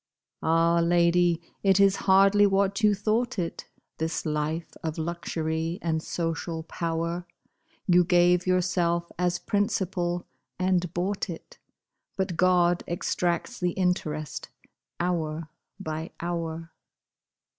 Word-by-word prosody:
Ah, 165 Hz, +1 st, +3 dB
lady! 170 Hz, 0 st, +3 dB, 0.2 s
it 195 Hz, -1 st, +4 dB
is 195 Hz, 0 st, +5 dB
hardly 195 Hz, +2 st, +6 dB
what 195 Hz, +1 st, +1 dB
you 210 Hz, -1 st, +4 dB
thought 215 Hz, +4 st, 0 dB
it, 170 Hz, -3 st, -4 dB, 0.3 s
This 160 Hz, +1 st, -2 dB
life 155 Hz, +2 st, -2 dB
of 160 Hz, -1 st, -4 dB
luxury 165 Hz, 0 st, -2 dB
and 160 Hz, -2 st, 0 dB
social 165 Hz, 0 st, -3 dB
power; 170 Hz, +1 st, -3 dB, 0.6 s
You 180 Hz, -1 st, +5 dB
gave 175 Hz, 0 st, +3 dB
yourself 175 Hz, -2 st, +1 dB
as 175 Hz, -1 st, +1 dB
principal, 190 Hz, -4 st, -1 dB, 0.3 s
and 180 Hz, -2 st, +1 dB
bought 190 Hz, +3 st, -1 dB
it, 165 Hz, -, -9 dB, 0.6 s
But 190 Hz, -2 st, -1 dB
God 175 Hz, 0 st, +3 dB
extracts 175 Hz, +5 st, -1 dB
the 180 Hz, -1 st, 0 dB
interest 155 Hz, -5 st, -2 dB, 0.5 s
hour 165 Hz, -3 st, -2 dB, 0.3 s
by 160 Hz, -2 st, -5 dB
hour. 165 Hz, -1 st, -4 dB
175 Hz, 110 wpm, -27 LUFS, 165-185 Hz, 0.6 s, hardly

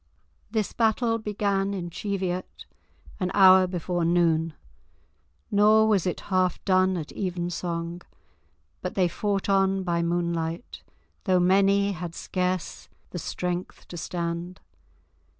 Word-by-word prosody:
This 215 Hz, -2 st, -1 dB
battle 230 Hz, 0 st, +1 dB
began 200 Hz, -2 st, -1 dB
in 175 Hz, -2 st, -5 dB
Cheviot, 185 Hz, -1 st, -4 dB, 0.5 s
an 185 Hz, -2 st, 0 dB
hour 190 Hz, -1 st, +7 dB
before 175 Hz, -1 st, -2 dB
noon, 165 Hz, -2 st, +2 dB, 1.0 s
nor 215 Hz, +2 st, +5 dB
was 200 Hz, -4 st, +2 dB
it 180 Hz, -, -2 dB
half 185 Hz, -1 st, +2 dB
done 185 Hz, -1 st, +3 dB
at 155 Hz, -3 st, -6 dB
evensong, 175 Hz, -2 st, -3 dB, 0.8 s
but -, -, -4 dB
they 185 Hz, -2 st, +3 dB
fought 200 Hz, +2 st, -2 dB
on 195 Hz, -1 st, +2 dB
by 170 Hz, -2 st, 0 dB
moonlight 170 Hz, +1 st, -2 dB, 0.4 s
though 185 Hz, -3 st, +3 dB
many 195 Hz, +2 st, +3 dB
had 175 Hz, -2 st, -6 dB
scarce 180 Hz, -1 st, -3 dB, 0.2 s
the 175 Hz, -, -4 dB
strength 180 Hz, +2 st, -4 dB
to -, -, -8 dB
stand. 170 Hz, +1 st, -4 dB
185 Hz, 115 wpm, -26 LUFS, 175-195 Hz, 1.0 s, hour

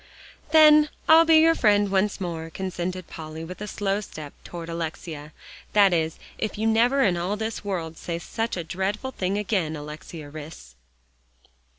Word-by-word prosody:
"Then 305 Hz, -1 st, +7 dB, 0.2 s
I'll 325 Hz, +1 st, +8 dB
be 325 Hz, 0 st, +6 dB
your 325 Hz, +1 st, +6 dB
friend 205 Hz, -7 st, +3 dB
once 195 Hz, +1 st, +1 dB
more," 165 Hz, -3 st, -4 dB
consented 185 Hz, 0 st, -4 dB
Polly 160 Hz, 0 st, -8 dB
with 180 Hz, +4 st, -9 dB
a 210 Hz, -, -4 dB
slow 200 Hz, 0 st, -1 dB
step 155 Hz, -7 st, -9 dB
toward 170 Hz, -1 st, -8 dB
Alexia, 160 Hz, -2 st, -5 dB, 0.4 s
"that 200 Hz, -3 st, +5 dB
is, 160 Hz, -1 st, 0 dB, 0.2 s
if 215 Hz, -, -3 dB
you 220 Hz, -, -1 dB
never 240 Hz, +5 st, +3 dB
in 180 Hz, -6 st, +2 dB
all 185 Hz, +5 st, -2 dB
this 220 Hz, 0 st, -4 dB
world 170 Hz, -5 st, -4 dB
say 170 Hz, -1 st, -4 dB
such 225 Hz, +5 st, -3 dB
a 175 Hz, -, -3 dB
dreadful 195 Hz, +9 st, -3 dB
thing 195 Hz, -4 st, -2 dB
again, 190 Hz, -6 st, -1 dB
Alexia 150 Hz, 0 st, -9 dB
Rhys." 150 Hz, -, -10 dB
185 Hz, 165 wpm, -25 LUFS, 165-215 Hz, 0.4 s, I'll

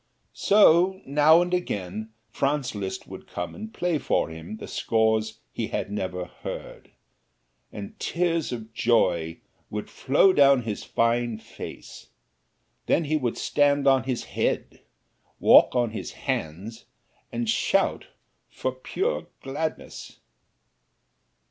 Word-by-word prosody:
So 190 Hz, -2 st, +5 dB
now 150 Hz, +4 st, +5 dB
and 175 Hz, 0 st, -4 dB
again 105 Hz, -, -3 dB, 0.2 s
Franz 140 Hz, +1 st, 0 dB
Liszt 100 Hz, -2 st, -5 dB
would -, -, -10 dB
come 90 Hz, -, -5 dB
and 220 Hz, +2 st, -8 dB
play 175 Hz, -6 st, -1 dB
for -, -, 0 dB
him 80 Hz, +6 st, -8 dB
the -, -, -8 dB
scores 110 Hz, -1 st, 0 dB
he -, -, -2 dB
had -, -, -3 dB
never 90 Hz, -3 st, -3 dB
heard, -, -, -8 dB, 0.8 s
and 100 Hz, -1 st, -8 dB
tears 170 Hz, -3 st, 0 dB
of 115 Hz, -2 st, -6 dB
joy 85 Hz, -9 st, +1 dB, 0.3 s
would 105 Hz, 0 st, -5 dB
flow 145 Hz, +8 st, +4 dB
down 140 Hz, -4 st, +5 dB
his 110 Hz, -2 st, -4 dB
fine 115 Hz, -1 st, 0 dB
face; 110 Hz, -, -10 dB, 0.8 s
then 170 Hz, -, +3 dB
he 155 Hz, +1 st, 0 dB
would 125 Hz, -6 st, -1 dB
stand 145 Hz, -1 st, +2 dB
on 135 Hz, -3 st, +4 dB
his 130 Hz, -3 st, -2 dB
head, -, -, -2 dB, 0.6 s
walk -, -, +7 dB
on 120 Hz, -2 st, +2 dB
his 110 Hz, -, -6 dB
hands 95 Hz, +9 st, -4 dB, 0.5 s
and 120 Hz, 0 st, -2 dB
shout 110 Hz, -, +1 dB, 0.4 s
for 130 Hz, -, -3 dB
pure 380 Hz, -, -3 dB, 0.2 s
gladness. 145 Hz, +4 st, -5 dB
120 Hz, 125 wpm, -26 LUFS, 110-150 Hz, 0.8 s, walk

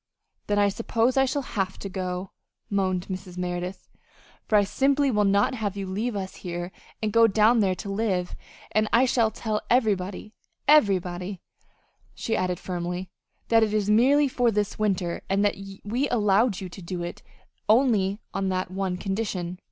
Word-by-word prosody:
"Then 205 Hz, -, +1 dB
I 205 Hz, 0 st, +4 dB
suppose 230 Hz, +3 st, 0 dB
I 270 Hz, 0 st, +4 dB
shall 280 Hz, +2 st, -1 dB
have 195 Hz, -6 st, -3 dB
to -, -, -6 dB
go," 185 Hz, -1 st, -4 dB, 0.4 s
moaned 185 Hz, -2 st, 0 dB
Mrs. 185 Hz, -1 st, -7 dB
Merideth, 180 Hz, +1 st, -4 dB, 0.6 s
"for 215 Hz, -, +2 dB
I 205 Hz, -, +5 dB
simply 275 Hz, +6 st, +2 dB
will 210 Hz, -2 st, +2 dB
not 200 Hz, +6 st, +3 dB
have 205 Hz, -5 st, -3 dB
you 195 Hz, -, -3 dB
leave 210 Hz, +5 st, -2 dB
us 190 Hz, -1 st, -5 dB
here 175 Hz, 0 st, -5 dB, 0.3 s
and 210 Hz, -2 st, 0 dB
go 230 Hz, 0 st, +6 dB
down 220 Hz, +3 st, +4 dB
there 190 Hz, -3 st, +2 dB
to 200 Hz, -, -8 dB
live; 195 Hz, -3 st, -1 dB, 0.4 s
and 215 Hz, +1 st, +2 dB
I 240 Hz, +3 st, +5 dB
shall 235 Hz, -3 st, +2 dB
tell 215 Hz, -1 st, -3 dB
everybody, 210 Hz, -4 st, 0 dB, 0.3 s
everybody," 190 Hz, -, +3 dB, 0.8 s
she 225 Hz, -, -2 dB
added 180 Hz, -1 st, -1 dB
firmly, 180 Hz, 0 st, -4 dB, 0.4 s
"that 225 Hz, -1 st, +5 dB
it 215 Hz, -1 st, +1 dB
is 210 Hz, -1 st, +1 dB
merely 275 Hz, +7 st, +5 dB
for 245 Hz, -2 st, +1 dB
this 210 Hz, -2 st, -1 dB
winter, 185 Hz, -5 st, 0 dB
and 200 Hz, +2 st, +2 dB
that 205 Hz, -, +3 dB, 0.3 s
we 240 Hz, +7 st, -1 dB
allowed 210 Hz, -2 st, +2 dB
you 190 Hz, -, -4 dB
to 190 Hz, -, -11 dB
do 175 Hz, 0 st, -5 dB
it 175 Hz, -, -6 dB, 0.5 s
only 215 Hz, -4 st, +3 dB
on 195 Hz, -1 st, -1 dB
that 185 Hz, -1 st, -2 dB
one 190 Hz, -1 st, -2 dB
condition." 190 Hz, -3 st, -3 dB
200 Hz, 170 wpm, -26 LUFS, 185-225 Hz, 0.8 s, go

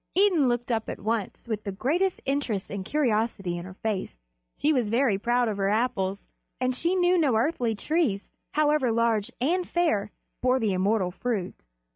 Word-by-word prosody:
Idun 360 Hz, -9 st, +4 dB
looked 240 Hz, 0 st, -1 dB
up 225 Hz, -1 st, -1 dB
at -, -, -5 dB
once 220 Hz, +1 st, -3 dB
with 215 Hz, -2 st, -3 dB
the 200 Hz, -, -3 dB
greatest 335 Hz, -, 0 dB
interest 270 Hz, -8 st, -1 dB
and 200 Hz, -1 st, -4 dB
curiosity 220 Hz, -8 st, 0 dB
in 175 Hz, 0 st, -6 dB
her 185 Hz, 0 st, -10 dB
face. 210 Hz, -, -3 dB, 0.4 s
She 305 Hz, +2 st, +2 dB
was 245 Hz, -6 st, +1 dB
very 230 Hz, -3 st, +2 dB
proud 240 Hz, +2 st, +2 dB
of 210 Hz, -2 st, -2 dB
her 195 Hz, 0 st, +1 dB
Apples, 210 Hz, -3 st, 0 dB, 0.3 s
and 255 Hz, 0 st, +1 dB
she 335 Hz, +8 st, 0 dB
knew 360 Hz, 0 st, +3 dB
no 280 Hz, -8 st, +3 dB
earthly 235 Hz, -2 st, +1 dB
trees, 265 Hz, -, 0 dB, 0.3 s
however 300 Hz, -4 st, +3 dB
large 225 Hz, -2 st, +1 dB
and 345 Hz, +8 st, 0 dB
fair, 265 Hz, -13 st, +1 dB, 0.3 s
bore 255 Hz, +1 st, +3 dB
the 215 Hz, -5 st, +1 dB
immortal 190 Hz, 0 st, +1 dB
fruit. 200 Hz, -2 st, -2 dB
235 Hz, 175 wpm, -27 LUFS, 205-285 Hz, 0.4 s, Idun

